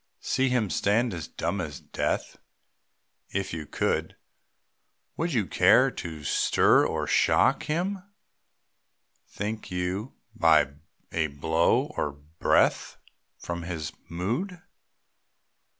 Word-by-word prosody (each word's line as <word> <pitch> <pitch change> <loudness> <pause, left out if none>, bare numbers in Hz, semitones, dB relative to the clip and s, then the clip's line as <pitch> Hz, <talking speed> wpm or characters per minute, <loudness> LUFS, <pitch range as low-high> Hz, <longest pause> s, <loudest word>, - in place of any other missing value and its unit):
See 130 +1 +1
him 120 -6 +1
stand 110 +3 +1
as 85 -3 -5
dumb 90 +4 -2
as 75 -5 -6
death. - - -3 0.9
If 95 -2 -3
you 80 -2 -5
could, - - -1 1.0
Would 170 +2 -1
you 115 -8 +1
care - - +5
to 80 -3 -7
stir 75 - +4
or - - -2
shock - - +3
Him, 180 +5 -1 1.3
think 105 +2 -5
you, 90 +6 -3 0.2
by - - +4 0.4
a 80 -1 +1
blow 80 - +1
or 75 - -1
breath, 75 +3 +1 0.4
From 85 0 -5
his 85 -3 -4 0.2
mood? 120 - -3
90 Hz, 105 wpm, -27 LUFS, 80-120 Hz, 1.3 s, care